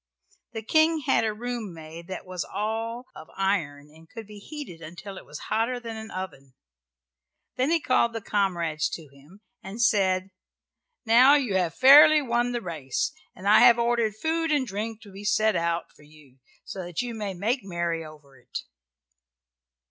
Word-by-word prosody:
The 225 -1 -5
King 315 +6 +3
had 245 - +2
a 220 - 0
room 230 -4 -5
made 160 +1 -10
that 190 -1 -7
was 185 -1 -4
all 225 +4 -4
of 155 - -12
iron 155 -7 -1
and 160 +1 -18
could 225 -2 -9
be 210 0 -12
heated 235 - -9
until 175 +5 -9
it - - -12
was 150 - -8
hotter 235 +3 -1
than 230 -2 -7
any 220 0 -8
oven. 140 -10 -8 1.0
Then 260 +3 0
he 335 0 +3
called 235 -5 +2
the 225 - -3
comrades 175 -7 -1
to 160 -3 -11
him 145 +9 -19 0.2
and 195 +4 -9
said, 195 -4 +2 0.7
"Now 250 +5 +7
you 260 -8 0
have 175 -3 -1
fairly 295 +4 +8
won 240 -3 0
the 240 -1 -3
race, 155 - -3 0.2
and 190 - -7
I 210 - +7
have 235 - +7
ordered 235 -2 +1
food 325 +6 -1
and 290 -3 +2
drink 220 +1 -5
to 205 - -14
be 195 +2 -10
set 215 +1 +2
out 170 0 -1
for - - -20
you, 145 -3 -20 0.3
so 190 - -6
that 175 +6 -3
you 240 -1 -5
may 205 -4 -4
make 225 +9 0
merry 170 -3 -3
over 145 -4 -15
it." 125 - -7
205 Hz, 180 wpm, -26 LUFS, 170-235 Hz, 1.0 s, fairly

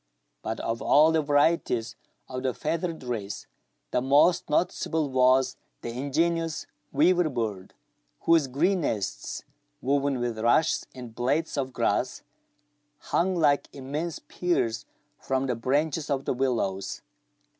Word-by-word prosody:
But 110 0 -4
of 115 0 -2
all 155 +3 +5
the 160 -1 +2
varieties 145 -5 +1 0.3
of 130 -1 -5
the 130 -1 -1
feathered 165 0 -2
race, 110 -5 -4 0.5
the - - +1
most 145 +7 +4
noticeable 155 -2 0
was 130 0 +3 0.2
the 120 - -4
ingenious 165 +6 -1 0.3
weaver 170 +3 +3
bird, 110 -8 -4 0.5
whose 165 -4 +4
green 170 +9 +1
nests, 105 -9 -3 0.4
woven 140 0 +1
with 120 -2 -2
rushes 120 +8 +2
and 125 -3 -9
blades 140 +8 0
of 135 -2 -2
grass, - - 0 0.7
hung 185 +5 0
like 145 -4 +2
immense 145 +5 -4
pears 170 -11 -1 0.3
from 135 0 -1
the 130 - 0
branches 145 +6 0
of 140 -1 -1
the - - 0
willows. 115 -7 -1
135 Hz, 125 wpm, -27 LUFS, 125-160 Hz, 0.7 s, all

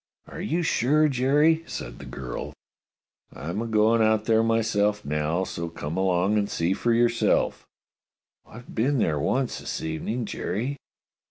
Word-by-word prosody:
'* - - -42
Are - - -8
you 170 +2 -1
sure, 155 +2 +3
Jerry? 145 +5 +3
" - - -25
said - - -8
the - - -9
girl. 65 -2 -6 0.8
I'm 85 +8 -4
a 115 - -3
goin' 110 +1 +3
out 110 -1 +3
there 110 -1 +4
myself 110 -2 +1
now; 75 +4 0
so 85 -2 -4
come 80 -1 -5
along 95 +2 +2
and 100 0 -1
see 85 +3 0
for 120 +4 0
yourself." 115 0 +2 0.8
"I've 120 +2 -13
been 135 +5 +1
there 80 - +1
once 130 - 0
this - - -4
evening, 105 +9 -3
Jerry." 125 +7 -3
110 Hz, 160 wpm, -25 LUFS, 90-120 Hz, 0.8 s, there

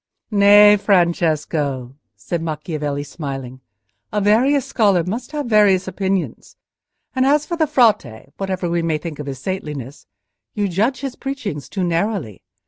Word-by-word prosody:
"Nay, 205 0 +7
Francesco," 155 - 0 0.2
said 170 -2 -4
Macchiavelli, 150 -2 -3
smiling, 135 -3 -7 0.5
"a 210 - 0
various 245 +7 +3
scholar 200 -7 +2
must 235 - -5
have 295 -2 -3
various 205 -5 +3
opinions. 190 -1 -3 0.6
And 260 - +2
as 290 +2 +3
for 340 - -3
the 320 -2 +1
Frate, 215 - +1
whatever 190 -2 -2
we 170 0 0
may 165 -2 0
think 150 -1 -7
of 150 - -6
his 135 -1 -5
saintliness, 150 -5 -6 0.5
you 205 -1 0
judge 220 +8 0
his 270 -2 -4
preaching 255 - -5
too 185 +8 -4
narrowly. 170 - -2
185 Hz, 140 wpm, -20 LUFS, 150-215 Hz, 0.6 s, Nay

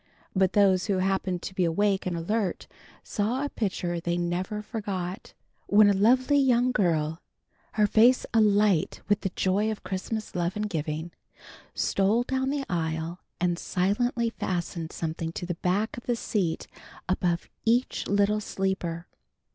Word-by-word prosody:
But 190 -1 +3
those 190 -2 +4
who 200 -2 +1
happened 185 -1 0
to - - -5
be 190 -1 +1
awake 190 +3 +1
and 175 -2 -2
alert 200 +3 -1 0.4
saw 240 +7 -1
a - - -2
picture 180 -7 -2
they 170 +1 -1
never 180 +4 -2
forgot, 195 -5 -5 0.3
when 205 0 +6
a - - +3
lovely 255 +8 +4
young 250 -2 +3
girl, 165 -7 0 0.5
her 210 -1 +3
face 230 +5 +5
alight 210 -5 +3
with 205 0 +2
the 190 - -1
joy 200 +3 +1
of 215 - -5
Christmas 210 +3 -4
love 175 0 -1
and 210 0 -1
giving, 160 -2 -3 0.6
stole 205 +5 +2
down 265 +1 -1
the 280 -1 -1
aisle 165 0 -2 0.2
and 175 -1 0
silently 230 +5 0
fastened 170 -5 -3
something 165 0 -3
on - - -5
the 175 - -2
back 200 +5 0
of 240 - -10
the 240 - +2
seat 190 -7 -1 0.4
above 175 -2 0 0.2
each 240 +3 +1
little 205 +1 +2
sleeper. 185 -4 -2
195 Hz, 150 wpm, -27 LUFS, 175-215 Hz, 0.6 s, when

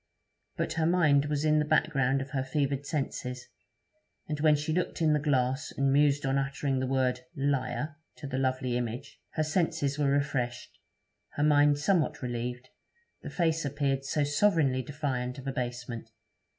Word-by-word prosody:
But - - -1
her 160 - +3
mind 155 -5 +4
was 150 0 -1
in 155 0 +4
the - - +2
background 135 -3 +2
of 135 - -13
her 135 -2 -1
fevered 140 0 -1
senses, 125 -4 -3 0.8
and 150 -1 -3
when 155 0 +5
she 150 +2 -2
looked 180 +2 -1
in 160 -2 +3
the 150 - +2
glass 135 -1 0
and 135 0 +1
mused 145 0 +3
on 135 +1 +2
uttering 140 0 -1
the 130 - -1
word, 130 -1 +1 0.2
'Liar!' 140 +1 -1 0.2
to 150 - -9
the 130 -1 -2
lovely 130 -2 0
image, 120 +3 -5
her 155 - 0
senses 150 -3 0
were 145 -2 +2
refreshed, 135 -4 -1 0.5
her 145 - -1
mind 145 -1 +5
somewhat 160 -2 +1
relieved, 125 +1 -4 0.5
the - - -7
face 165 -2 0
appeared 140 -1 -1
so 145 +2 0
sovereignly 145 -3 +2
defiant 130 -2 -3
of 135 - -9
abasement. 120 -3 -4
140 Hz, 165 wpm, -29 LUFS, 130-150 Hz, 0.8 s, when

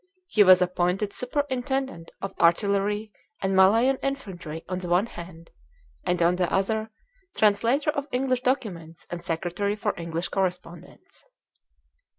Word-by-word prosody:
He 230 -12 +2
was 185 -1 +7
appointed 180 +3 -1
Superintendent 265 - -2
of 195 - -4
Artillery 200 +4 +2 0.3
and 190 0 0
Malayan 225 +8 +5
Infantry 185 - -5
on 185 0 -3
the 180 -1 -6
one 180 +4 +3
hand; 170 -5 -11 0.5
and 180 -1 0
on 175 +1 +3
the 180 -1 0
other, 220 +3 0 0.5
Translator 230 +8 +3
of 280 -1 -4
English 255 0 0
Documents 180 - -3
and 175 0 -5
Secretary 175 +4 -2
for 210 -1 -1
English 170 0 -3
Correspondence. 180 - -5
195 Hz, 130 wpm, -26 LUFS, 175-240 Hz, 0.5 s, was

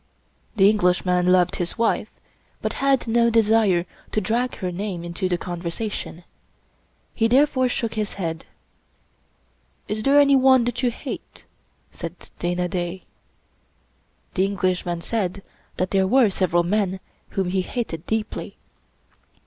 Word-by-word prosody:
The 195 -2 +6
Englishman 180 -3 +2
loved 180 -1 +3
his 175 +3 -2
wife, 230 -1 +1 0.5
but - - -2
had 275 -3 +2
no 235 +1 +3
desire 220 -5 +3 0.3
to - - +1
drag 235 +5 -1
her 180 -1 -3
name 185 -1 -4
into 175 +2 -3
the 175 - +1
conversation. 175 +1 -5 0.9
He 225 - +2
therefore 260 +1 +3
shook 235 -3 -2
his 215 -1 -2
head. 165 -4 -4 1.4
"Is 210 +1 -2
there 280 +4 +5
anyone 265 -3 +5
that 245 +1 -2
you 250 - +2
hate?" 235 - -8 0.5
said 170 0 -7 0.2
Dana 175 +1 -1
Da. 180 0 -3 1.3
The 190 - +2
Englishman 185 -3 -1
said 195 -2 -2 0.3
that 185 - -1
there 190 -1 +3
were 240 -1 +4
several 175 -2 +1
men 190 0 0 0.3
whom 190 -2 0
he 190 +1 +1
hated 180 -6 -4
deeply. 220 -1 -3
195 Hz, 130 wpm, -23 LUFS, 180-230 Hz, 1.4 s, The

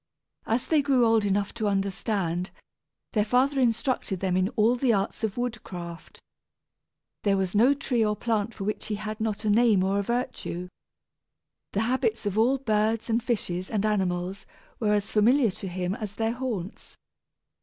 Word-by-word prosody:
As 230 +2 0
they 310 -2 +3
grew 270 -4 +3
old 225 -2 +3
enough 200 0 0
to 220 -2 -2
understand, 195 -2 -1 0.6
their 210 - +3
father 260 +5 +2
instructed 230 -4 0
them 185 -1 0
in 185 +1 +2
all 225 +2 +4
the 250 0 +2
arts 200 +1 -1
of 215 -1 -1
woodcraft. 185 -8 -6 1.0
There 200 -1 +2
was 190 -2 -1
no 240 +7 +5
tree 250 -4 0
or 210 -1 +1
plant 225 0 -1
for 200 - -5
which 210 +2 -3
he 215 - -1
had 215 +1 -5
not 220 0 -2
a - - +2
name 215 -3 +4
or 195 +1 +1
a - - +2
virtue. 200 -5 -3 1.0
The 200 - +1
habits 260 - 0
of 205 -1 -1
all 240 +5 +3
birds 220 -2 0
and 230 +2 +2
fishes 190 -7 -2
and 215 -2 0
animals 190 -2 -1 0.3
were 210 -2 +2
as 205 0 0
familiar 230 +2 +4
to 195 0 -7
him 180 0 -2
as 210 -3 -5
their 225 +1 0
haunts. 235 -6 -5
215 Hz, 170 wpm, -27 LUFS, 195-235 Hz, 1.0 s, no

